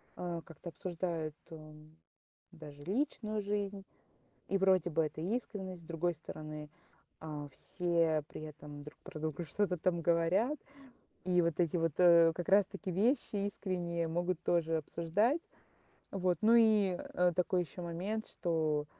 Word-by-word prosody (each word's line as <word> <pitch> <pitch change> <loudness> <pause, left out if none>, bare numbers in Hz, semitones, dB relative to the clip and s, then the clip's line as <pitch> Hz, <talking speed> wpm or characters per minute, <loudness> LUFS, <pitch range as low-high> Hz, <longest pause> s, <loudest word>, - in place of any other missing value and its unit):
э, 175 -1 -3
как-то 165 +1 -9
обсуждают, 165 -3 -3
м, 155 -1 -12 0.6
даже 150 -4 -11
личную 215 - -1
жизнь. 200 -1 -2 0.6
И 195 - +1
вроде 185 -3 +3
бы 160 0 +2
это 155 0 -5
искренность. 190 -2 -3
С - - -16
другой 170 +1 0
стороны, 155 -1 -8 0.5
а, 150 -2 -5
все 170 -3 +1
при - - -8
этом 150 -1 -9
друг 150 +1 -11
про 185 -4 -8
друга 155 +2 -3
что-то 180 +2 0
там 170 0 +1
говорят. 175 - +2 0.7
И 180 -1 +4
вот 170 +1 0
эти 175 0 +2
вот, 165 -1 +1
э, 170 -2 +7
как 175 +3 -4
раз-таки, 195 -1 +3
вещи 205 0 +1
искренние, 175 -4 -2
могут 175 +1 -1
тоже 165 -2 +2
обсуждать. 185 - +1 0.7
Вот, 180 -3 +1
ну 225 +2 +5
и, 215 -5 +5
э, 180 0 +1
такой 180 0 +2
еще 175 +2 -9
момент, 185 +6 -3
что, 155 -4 0
175 Hz, 140 wpm, -34 LUFS, 160-195 Hz, 0.7 s, э